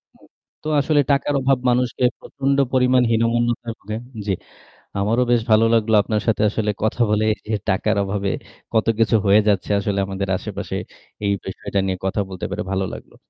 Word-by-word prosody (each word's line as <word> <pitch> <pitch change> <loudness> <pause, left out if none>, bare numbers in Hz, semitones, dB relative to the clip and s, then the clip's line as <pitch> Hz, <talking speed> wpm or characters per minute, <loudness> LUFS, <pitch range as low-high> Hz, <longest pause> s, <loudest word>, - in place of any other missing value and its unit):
হুম। - - -22 0.4
তো - - -5
আসলে 145 +1 +2
টাকার 140 +1 +1
অভাব 135 0 +3
মানুষকে 125 0 0 0.2
প্রচন্ড 140 0 -1 0.2
পরিমাণ 125 0 +4
হীনমন্যতায় 115 0 +1
ভুগে 110 +2 -5 0.3
জ্বী, 100 - +1 0.7
আমারও 110 +5 +2
বেশ 120 -1 +4
ভালো 110 +1 +6
লাগলো 110 -1 +3
আপনার 105 0 -1
সাথে 110 - +2
আসলে 105 0 -1
কথা 110 +2 0
বলে 105 +1 +2 0.2
যে 110 - 0
টাকার 105 +3 +1
অভাবে 100 0 -2 0.4
কতকিছু 115 0 +2
হয়ে 105 +2 +6
যাচ্ছে 100 -3 +1
আসলে 100 0 -1
আমাদের 95 0 -3
আশেপাশে - - -5 0.5
এই 100 - +2
বিষয়টা 95 +1 -3
নিয়ে 95 -1 -1
কথা 95 +2 0
বলতে 95 -2 -5
পারে - - -2
ভালো 95 0 0
লাগলো। - - -11
110 Hz, 165 wpm, -21 LUFS, 100-120 Hz, 0.7 s, ভালো